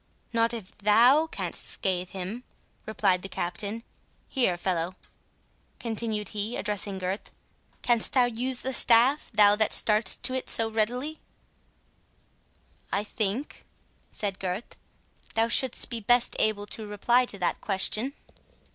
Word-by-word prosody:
"Not 230 0 +2
if 220 -4 -7
THOU 240 +10 +4
canst - - -3
scathe 185 -2 -2
him," 195 +6 -6 0.4
replied 200 -4 +1
the 195 - -7
Captain.—"Here, 200 +2 -4
fellow," 175 0 -2 0.8
continued 220 -2 -3
he, 210 +2 -4
addressing 205 -2 -3
Gurth, 190 +2 -5 0.5
"canst 235 -2 +1
thou 255 -2 +4
use 245 +2 -2
the 265 - -3
staff, 245 +5 +6
that 205 0 +4
thou 215 - +4
starts 215 +1 +2
to 255 - -1
it 260 - -3
so 225 -1 +3
readily?" 245 +8 -1 1.7
"I 200 - 0
think," 215 +5 -3 0.5
said 200 -2 -3
Gurth, 190 +4 -5 0.6
"thou 225 +1 +2
shouldst 260 +2 +2
be 235 - -2
best 240 +3 +2
able 210 -1 0
to 215 +1 -6
reply 240 +5 +1
to 200 - -4
that 180 -2 -2
question." 215 +6 +1
220 Hz, 130 wpm, -26 LUFS, 200-240 Hz, 1.7 s, staff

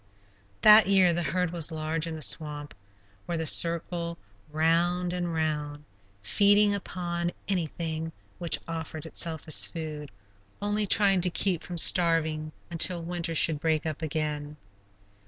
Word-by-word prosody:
That 215 0 +8
year 190 -3 +4
the 175 - -1
herd 175 +3 -2
was 170 -2 -1
large 160 +1 -3
in 165 - -5
the 155 - -4
swamp, 145 +7 -4 0.5
where 170 - -3
they 160 - -3
circled 170 +1 +2 0.3
round 170 +3 0
and 175 -1 -3
round, 150 -2 -3 0.4
feeding 205 - +3
upon 175 -3 -4 0.2
anything 165 -3 -3 0.3
which 170 -2 -1
offered 160 -1 -6
itself 160 -1 -2
as 155 - +3
food, 155 -3 -6 0.5
only 205 0 -2
trying 195 -2 +4
to 180 - +1
keep 180 -1 0
from 175 - -8
starving 160 -3 +3 0.2
until 170 +1 +3
winter 170 -1 -4
should 155 -1 +2
break 160 0 -1
up 155 0 -5
again. 150 -1 -4
165 Hz, 140 wpm, -27 LUFS, 155-175 Hz, 0.5 s, That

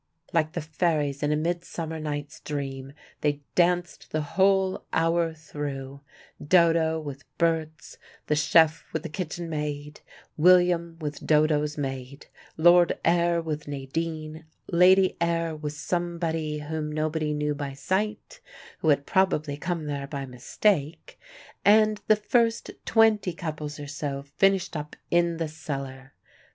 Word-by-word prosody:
Like 155 -1 +1
the 170 - -2
fairies 155 -3 -1
in 145 0 +1
a - - +3
Midsummer 165 0 -3
night's 145 -1 -5
Dream, 135 -2 -5 0.3
they 145 -1 -1
danced 175 0 +1
the 155 0 -1
whole 190 +3 +2
hour 165 0 +2
through, 140 -3 -6 0.4
Dodo 165 -1 +3
with 145 -2 -7
Berts, 160 -2 -1 0.3
the 150 - +1
chef 155 +1 +4
with 160 - -2
the - - -5
kitchen 175 0 -5
maid, 150 -1 -4 0.4
William 175 0 +4
with 150 -2 -5
Dodo's 150 -1 +2
maid, 135 -1 -5 0.3
Lord 175 +1 +5
Ayr 170 0 +3
with 155 -2 -4
Nadine, 155 +3 -4 0.3
Lady 185 +2 +5
Ayr 165 -1 0
with 150 -1 -5
somebody 165 -1 -2
whom 150 0 -4
nobody 155 0 -1
knew 150 0 -1
by 145 -1 -5
sight, 210 - -2 0.4
who 160 - +1
had 140 -1 +3
probably 155 -6 +1
come 165 +1 -3
there 140 -2 -4
by 140 -1 -5
mistake, 155 - -1 0.4
and 215 0 +5
the 215 - +6
first 230 +2 +1
twenty 220 -5 +3
couples 155 -4 -5
or 145 - -6
so 140 -1 -4
finished 190 +5 +1
up 150 0 -5 0.2
in 170 -1 +2
the 165 -1 -2
cellar. 135 -4 -7
155 Hz, 135 wpm, -26 LUFS, 145-175 Hz, 0.4 s, the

